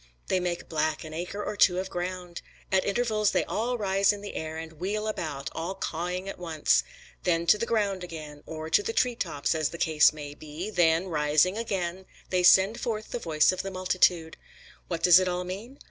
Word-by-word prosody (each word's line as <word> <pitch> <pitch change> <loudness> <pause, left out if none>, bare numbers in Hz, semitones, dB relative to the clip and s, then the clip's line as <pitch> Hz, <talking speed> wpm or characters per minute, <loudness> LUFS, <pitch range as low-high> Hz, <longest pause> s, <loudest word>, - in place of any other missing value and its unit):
They 185 - +2
make 175 -1 -3
black 155 -1 -1
an 155 -1 -9
acre 180 +5 -4
or 210 - -3
two 180 -3 +4
of 190 +1 -3
ground. 180 0 -5 0.3
At 190 -1 +3
intervals 215 -1 +1
they - - +2
all 240 +3 -1
rise 195 -2 +3
in 205 -1 -6
the 205 - -7
air, 160 0 -5
and 160 -1 -8
wheel 210 +4 -2
about, 140 -10 -4
all 170 +4 -4
cawing 180 +1 -3
at 195 - -6
once. 165 -4 +2 0.4
Then 170 -1 +1
to 210 - +5
the 230 - -1
ground 200 -5 0
again, 155 -4 -8
or 155 0 -6
to 160 - +3
the 225 - -3
tree 250 +1 +2
tops, 145 -10 -1
as 155 -2 0
the 170 - -8
case 155 -2 +4
may 145 -1 -8
be; 155 +7 -7
then, 170 -2 +3
rising 155 +3 +2
again, 190 -5 -3 0.3
they 185 -1 +2
send 190 +4 +6
forth 215 -2 -3
the 245 - -2
voice 155 -5 +3
of 185 - -3
the 195 - -5
multitude. 180 -3 +1 0.5
What 170 -2 -4
does 180 0 +8
it 185 - 0
all 180 0 -1
mean? 205 +10 -7
180 Hz, 205 wpm, -27 LUFS, 160-200 Hz, 0.5 s, does